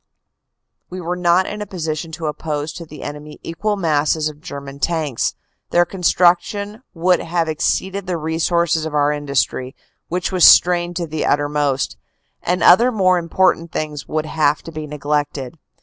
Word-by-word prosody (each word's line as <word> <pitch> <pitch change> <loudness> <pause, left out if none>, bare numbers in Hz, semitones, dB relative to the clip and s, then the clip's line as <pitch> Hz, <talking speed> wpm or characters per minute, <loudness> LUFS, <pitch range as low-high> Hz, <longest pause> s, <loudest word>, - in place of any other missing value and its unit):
" - - -57
We 185 - -6
were 175 0 -3
not 180 +1 +3
in 210 0 -5
a 210 - -5
position 160 -3 -4
to 160 0 -5
oppose 150 0 -3
to 170 0 -9
the 150 - -10
enemy 150 +1 -8
equal 205 +6 -2
masses 155 -2 +1
of 150 0 -13
German 140 -4 -8
tanks. 155 -6 -1 0.3
Their 175 0 +4
construction 190 +4 +1
would 175 +1 +3
have 165 0 -1
exceeded 190 +5 -1
the 180 -2 -1
resources 160 +1 0
of 155 - -5
our 145 0 +3
industry, 140 -2 -1 0.3
which 180 +3 -2
was 185 -2 +1
strained 175 0 +6
to 170 -1 -2
the 155 -1 -3
uttermost, 145 -2 0 0.5
or 180 - +2
other 240 +7 +7
more 185 -5 +3
important 170 0 +1
things 150 -2 -4
would 155 0 -2
have 150 -1 +1
had - - -22
to 165 - -7
be 155 -1 -6
neglected. 145 -1 -3
160 Hz, 165 wpm, -19 LUFS, 150-180 Hz, 0.5 s, other